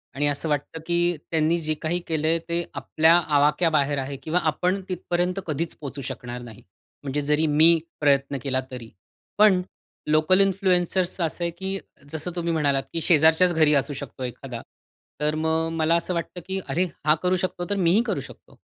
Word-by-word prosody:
आणि 145 Hz, +1 st, +1 dB
असं 145 Hz, +2 st, -1 dB
वाटतं, 145 Hz, +2 st, -2 dB
की 175 Hz, -1 st, +2 dB
त्यांनी 160 Hz, +1 st, +2 dB
जे 155 Hz, 0 st, -1 dB
काही 175 Hz, +3 st, -1 dB
केलंय, 160 Hz, +1 st, +1 dB
ते 170 Hz, 0 st, 0 dB
आपल्या 160 Hz, +1 st, +3 dB, 0.2 s
आवाक्या 150 Hz, +4 st, +3 dB
बाहेर 145 Hz, -1 st, +1 dB
आहे, 135 Hz, +1 st, -4 dB
किंवा 170 Hz, +3 st, +1 dB
आपण 185 Hz, +4 st, -1 dB
तिथपर्यंत 180 Hz, +1 st, -1 dB
कधीच 160 Hz, +2 st, -3 dB
पोहोचू 140 Hz, -1 st, -7 dB
शकणार 125 Hz, 0 st, -7 dB
नाही. 115 Hz, -3 st, -11 dB, 0.4 s
म्हणजे 145 Hz, +1 st, -2 dB
जरी 150 Hz, +2 st, +2 dB
मी 160 Hz, +3 st, +6 dB, 0.2 s
प्रयत्न 140 Hz, -1 st, +2 dB
केला, 130 Hz, -1 st, 0 dB
तरी. 120 Hz, -3 st, -8 dB, 0.5 s
पण 205 Hz, -3 st, +5 dB, 0.5 s
लोकल 155 Hz, +5 st, +4 dB
इन्फ्लुएन्सर्सचं 185 Hz, -2 st, +1 dB
असं 165 Hz, +2 st, -4 dB
आहे, 170 Hz, -, -1 dB
की 190 Hz, +3 st, -4 dB, 0.4 s
जसं 160 Hz, +3 st, -4 dB
तुम्ही 170 Hz, -1 st, -1 dB
म्हणालात, 140 Hz, -4 st, +1 dB
की 165 Hz, -, 0 dB
शेजारच्याच 160 Hz, +3 st, +4 dB
घरी 155 Hz, -2 st, +4 dB
असू 145 Hz, -, -6 dB
शकतो 130 Hz, -1 st, -9 dB
एखादा, 125 Hz, -1 st, -6 dB, 0.6 s
तर 150 Hz, +1 st, +1 dB
मग 160 Hz, +1 st, 0 dB
मला 160 Hz, +1 st, +3 dB
असं 170 Hz, +2 st, -1 dB
वाटतं, 170 Hz, +1 st, -4 dB
की 190 Hz, 0 st, -2 dB
अरे! 175 Hz, +7 st, +1 dB, 0.2 s
हा 150 Hz, -, +5 dB
करू 180 Hz, 0 st, +2 dB
शकतो, 175 Hz, 0 st, -6 dB
तर 205 Hz, -, +1 dB
मीही 200 Hz, +7 st, +4 dB
करू -, -, -1 dB
शकतो. -, -, -19 dB
160 Hz, 175 wpm, -24 LUFS, 145-175 Hz, 0.6 s, मी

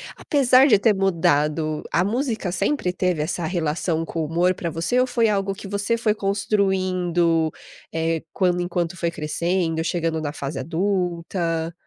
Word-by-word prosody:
apesar 265 Hz, -1 st, +4 dB
de 215 Hz, -6 st, +6 dB
ter 215 Hz, +1 st, +3 dB
mudado, 155 Hz, -5 st, +1 dB
a 175 Hz, -, +2 dB
música 225 Hz, -3 st, -1 dB
sempre 195 Hz, -1 st, 0 dB
teve 180 Hz, -4 st, 0 dB
essa 170 Hz, +1 st, -3 dB
relação 165 Hz, -1 st, -1 dB
com 165 Hz, -, -4 dB
o -, -, -1 dB
humor 175 Hz, +3 st, +2 dB
pra 170 Hz, -1 st, -4 dB
você 165 Hz, +10 st, 0 dB
ou 255 Hz, -, +3 dB
foi 230 Hz, -2 st, +2 dB
algo 195 Hz, -1 st, 0 dB
que 200 Hz, -, -9 dB
você 205 Hz, +3 st, -1 dB
foi 220 Hz, -2 st, +1 dB
construindo, 185 Hz, -5 st, +1 dB, 0.4 s
eh, 165 Hz, 0 st, -1 dB
quando 180 Hz, -2 st, +1 dB
enquanto 175 Hz, 0 st, -2 dB
foi 170 Hz, -1 st, -1 dB
crescendo, 165 Hz, +1 st, -1 dB
chegando 165 Hz, -2 st, -1 dB
na 145 Hz, -1 st, -3 dB
fase 140 Hz, 0 st, -5 dB
adulta? 170 Hz, -2 st, -1 dB
175 Hz, 155 wpm, -23 LUFS, 165-200 Hz, 0.4 s, de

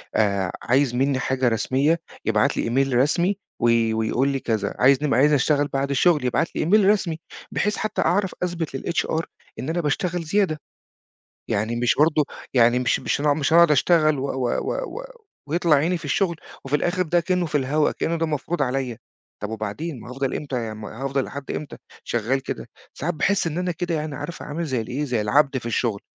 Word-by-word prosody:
آآ، 100 Hz, -4 st, +1 dB
عايز 130 Hz, 0 st, +2 dB
مني 135 Hz, +1 st, +1 dB
حاجه 130 Hz, -1 st, 0 dB
رسمية 135 Hz, +8 st, +1 dB, 0.2 s
يبعت -, -, +2 dB
لي -, -, 0 dB
email 135 Hz, +2 st, +1 dB
رسمي، 170 Hz, +9 st, +2 dB, 0.2 s
وي 115 Hz, -1 st, +3 dB
ويقول 110 Hz, +4 st, +1 dB
لي 135 Hz, -1 st, -1 dB
كذا، 110 Hz, -5 st, -2 dB
عايز 135 Hz, +3 st, +5 dB
نب 150 Hz, -, +1 dB
عايز 140 Hz, +6 st, +4 dB
أشتغل 145 Hz, +1 st, +2 dB
بعد 135 Hz, 0 st, -2 dB
الشغل 145 Hz, 0 st, +3 dB
يبعت 125 Hz, +7 st, 0 dB
لي -, -, 0 dB
email 205 Hz, +4 st, +4 dB
رسمي 185 Hz, -6 st, +1 dB, 0.3 s
بحيث 210 Hz, +1 st, 0 dB
حتّى 215 Hz, 0 st, -1 dB
أعرف 190 Hz, +3 st, +1 dB
أثبت 170 Hz, -6 st, -2 dB
للHR 165 Hz, +1 st, -1 dB, 0.4 s
إن 130 Hz, +6 st, -4 dB
أنا 170 Hz, +1 st, 0 dB
باشتغل 170 Hz, +4 st, -1 dB
زيادة، 165 Hz, -2 st, +1 dB, 0.9 s
يعني 110 Hz, +3 st, 0 dB
مش 120 Hz, 0 st, +2 dB
برضو 150 Hz, 0 st, +4 dB, 0.3 s
يعني 120 Hz, 0 st, +5 dB
مش 125 Hz, -2 st, +1 dB
مش -, -, -1 dB
هن 145 Hz, -1 st, +2 dB
مش 150 Hz, +1 st, 0 dB
أنا 170 Hz, -, +8 dB
أقعد 170 Hz, -2 st, +6 dB
أشتغل 155 Hz, 0 st, +4 dB
و 135 Hz, -, -2 dB
و 130 Hz, -3 st, -1 dB
و -, -, -2 dB
و -, -, -8 dB, 0.4 s
ويطلع 165 Hz, 0 st, +3 dB
عيني 170 Hz, +5 st, +1 dB
في -, -, -13 dB
الشغل 170 Hz, +4 st, 0 dB, 0.3 s
وفي 135 Hz, +2 st, +1 dB
الآخر 175 Hz, +5 st, 0 dB
ده 175 Hz, 0 st, +2 dB
كأنه 180 Hz, 0 st, 0 dB
في 155 Hz, -, -10 dB
الهواء، 145 Hz, +2 st, +2 dB
كأنه 170 Hz, -, -1 dB
ده 165 Hz, -, 0 dB
مفروض 155 Hz, +1 st, -2 dB
عليّا، 125 Hz, -3 st, -2 dB, 0.4 s
طيب 105 Hz, -, -3 dB
وبعدين 110 Hz, +7 st, -4 dB
ما 120 Hz, -, -10 dB
هافضل 135 Hz, +1 st, -2 dB
إمتى 125 Hz, -6 st, -3 dB
يم 110 Hz, 0 st, -7 dB
هافضل 135 Hz, +5 st, -2 dB
لحد 140 Hz, -1 st, -8 dB
إمتى 150 Hz, -, -5 dB, 0.3 s
شغال 120 Hz, +4 st, 0 dB
كده؟ -, -, -6 dB, 0.3 s
ساعات 170 Hz, +4 st, -2 dB
باحس 190 Hz, +4 st, +1 dB
إن 165 Hz, +1 st, -2 dB
أنا 180 Hz, 0 st, -1 dB
كده 175 Hz, +1 st, -3 dB
يعني 155 Hz, -2 st, -3 dB
عارفه 145 Hz, +5 st, -6 dB
عامل 155 Hz, +3 st, -3 dB
زي 130 Hz, -6 st, -1 dB
الإيه 125 Hz, +6 st, -3 dB
زي 125 Hz, -5 st, -1 dB
العبد 135 Hz, +6 st, +2 dB
في 120 Hz, -, -8 dB
الشغل، 115 Hz, -3 st, -1 dB
145 Hz, 195 wpm, -23 LUFS, 125-165 Hz, 0.9 s, أنا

